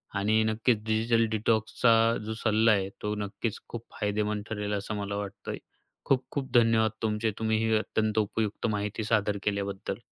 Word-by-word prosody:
आणि 110 +2 +2
नक्कीच 110 0 +1
डिजिटल 115 +1 +2
डिटॉक्सचा 110 +2 +2 0.3
जो 110 - -3
सल्ला 110 0 +4
आहे, 95 -2 +1
तो 105 - -1
नक्कीच 105 +2 -3
खूप 115 -1 -6 0.2
फायदेमंद 105 0 -1
ठरेल 105 -1 -3
असं 105 +1 -3
मला 100 0 -3
वाटतंय. 100 -1 -5 0.5
खूप 130 -1 +2
खूप 135 -2 -4
धन्यवाद 115 -2 +4
तुमचे, 110 0 0
तुम्ही 110 -1 +1
ही 110 - +3
अत्यंत 110 0 -1
उपयुक्त 105 +1 -1
माहिती 105 +1 -2
सादर 105 -2 +1
केल्याबद्दल. 100 -1 -2
110 Hz, 155 wpm, -28 LUFS, 105-110 Hz, 0.5 s, सल्ला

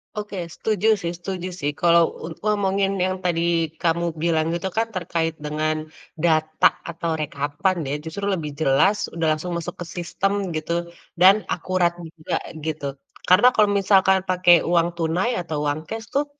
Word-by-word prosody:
Oke, 210 -2 -5 0.2
setuju 215 -1 -1
sih 170 - -2
setuju 185 0 -5
sih 145 0 -1
kalau 170 -1 +6 0.2
un 165 - -6
ngomongin 200 -2 +1
yang 185 0 -1
tadi 170 -2 +1 0.4
kamu 170 0 +1 0.2
bilang 160 -2 +2
itu 175 +3 -2
kan 225 - +3
terkait 165 -2 -1
dengan 155 +1 -2 0.3
data 155 -1 +3 0.2
atau 165 -1 -2
rekapan 145 +6 -1
ya - - -1
justru 200 +5 -3
lebih 165 -6 -2
jelas 155 +9 +3
udah 165 -1 -1
langsung 165 +4 -5
masuk 170 +1 -5
ke - - -3
sistem 195 +1 -1
gitu 170 +2 -2 0.4
dan 195 +3 +7
akurat 175 0 0
juga 165 -2 -5 0.3
gitu. 145 -3 -3 0.3
Karena 185 +7 +6
kalau 210 -1 +5
misalkan 190 -1 +4
pakai 180 -2 +5
uang 170 0 +2
tunai 175 +8 0
atau 155 -3 -3
uang 145 +1 0
cash 225 0 -5
tuh, 285 +2 +2
170 Hz, 155 wpm, -23 LUFS, 160-190 Hz, 0.4 s, dan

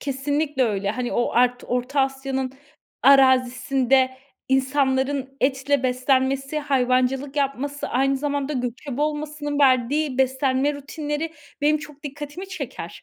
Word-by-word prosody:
Kesinlikle 285 +1 -1
öyle. 200 -3 -1
Hani, 245 +2 -3
o 240 - +1
art 245 +1 +2
Orta 250 +3 0
Asya'nın 265 -1 -2 0.5
arazisinde 260 0 +4 0.4
insanların 265 0 +1
etle 270 +1 +1
beslenmesi, 265 +3 +1
hayvancılık 265 0 +1
yapması, 280 0 -2
aynı 270 +2 +1
zamanda 285 +1 -2
göçebe 250 +1 -4
olmasının 300 -1 -2
verdiği 265 +1 +2
beslenme 265 +2 +1
rutinleri 295 +2 -4 0.3
benim 300 +1 +3
çok 300 -2 -12
dikkatimi 295 +6 -7
çeker. 370 - -7
270 Hz, 110 wpm, -23 LUFS, 260-290 Hz, 0.5 s, arazisinde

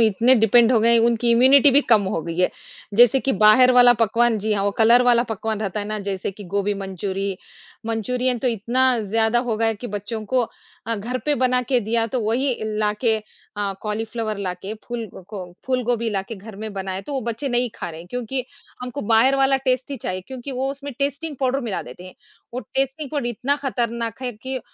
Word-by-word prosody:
इतने 230 +3 +4
डिपेंड 230 +1 +5
हो 230 - +5
गए 230 +1 +4
उनकी 235 0 +1
इम्यूनिटी 265 +4 +6
भी 280 - +5
कम 220 -3 +5
हो 190 - -1
गई 165 +1 -5
है। 180 - +3 0.4
जैसे 245 +3 +6
कि 270 - 0
बाहर 215 +6 +6
वाला 245 -1 +7
पकवान 230 +1 +2
जी 215 +1 -1
हाँ, 200 -1 0
वो 205 - +2
कलर 235 +2 +6
वाला 240 -1 +4
पकवान 220 -2 -4
रहता 210 -1 -2
है 205 - -5
ना, 215 0 -3
जैसे 195 -2 -3
कि 205 +1 -11
गोभी 200 +2 -1
मंचूरी 195 0 -4 0.5
मंचूरियन 245 +3 -1
तो 255 - 0
इतना 245 +3 +1
ज़्यादा 220 +3 +1
हो 240 -3 -2
गया 225 +1 +1
है 225 - 0
कि 225 +4 -8
बच्चों 210 +1 -5
को 255 +2 +2 0.4
अ, 230 - 0
घर 235 +5 -3
पे 295 - +3
बनाके 250 0 +1
दिया 225 +1 0
तो 250 +2 -2
वही 245 +5 0 0.2
लाके 215 +2 +1 0.4
अ, 205 -1 -1
कॉलीफ्लावर 215 0 -3
लाके, 190 +1 -4
फूल 240 -2 -5 0.2
को 185 -4 -8
फूलगोभी 245 -3 0
लाके 195 +2 -3
घर 200 +1 -11
में 215 +1 -6
बनाएँ 190 -1 -4
तो 285 - -8
वो 270 - -1
बच्चे 235 +4 -3
नहीं 245 -1 0
खा - - -5
रहें 165 +1 -10
क्योंकि 250 +4 -3 0.4
हमको 250 +3 -5
बाहर 245 +5 +5
वाला 270 0 +3
टेस्ट 255 +1 0
ही 280 - -3
चाहिए 185 -6 -4
क्योंकि 260 +1 -7
वो 265 +1 -1
उसमें 280 0 -7
टेस्टिंग 285 +2 -2
पाउडर 265 +1 +1
मिला 225 -7 -3
देते 130 +9 -11
हैं। 185 - -12 0.4
वो 250 - -2
टेस्टी 270 +3 -1
फूड 290 -5 -2
इतना 245 +5 -1
खतरनाक 235 -2 -3
है 250 -1 -3
कि 260 +4 -5
230 Hz, 205 wpm, -22 LUFS, 210-255 Hz, 0.5 s, वाला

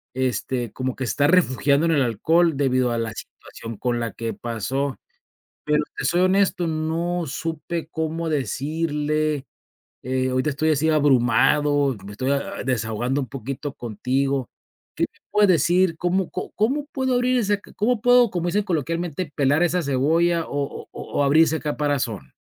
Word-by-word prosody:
este, 125 -2 -1
como 130 -1 -3
que 130 - -2
se - - -1
está 145 0 +2
refugiando 150 -3 +3
en 165 - +3
el 140 - +3
alcohol, 160 - +2
debido 130 -3 +2
a 115 - -1
la 110 -1 -3
situación 115 -2 -10
con 120 -1 -1
la 115 - -2
que 115 -1 -4
pasó, 130 +4 -3 0.7
pero 150 0 +2 0.2
te - - -3
soy 175 - +2
honesto, 185 -2 +2
no 165 +2 -1
supe 165 +3 -4
cómo 160 +1 -2
decirle, 150 0 -1 0.6
eh, 130 +1 0
ahorita 130 +4 0
estoy 155 +3 0
así 155 +2 +2
abrumado, 145 -1 +3
me 100 - -8
estoy, 130 +6 -1
ah 140 0 -1
ah, - - -4
desahogando 120 +2 -1
un 130 - -4
poquito 135 +2 -5
contigo, 130 +3 -1 0.5
¿qué - - -1
me - - -29
puedes 210 -1 +4
decir 175 +1 +3
cómo 180 +1 0
có 185 - -5
cómo 270 +8 0
puedo 260 -2 0
abrir 250 +1 +2
ese 205 -2 +2
c 205 - -15
cómo 230 +2 +1
puedo, 245 -2 +5
como 175 -1 -2
dicen 205 +4 +1
coloquialmente: 165 0 -2
"pelar 145 +4 +3
esa 175 0 +1
cebolla" 165 +5 +2
o - - -11
o 145 -1 -4
o - - -7 0.2
o - - +4
abrir 155 +4 +5
ese 160 +1 -1
caparazón? 145 -7 -2
150 Hz, 170 wpm, -23 LUFS, 130-170 Hz, 0.7 s, puedo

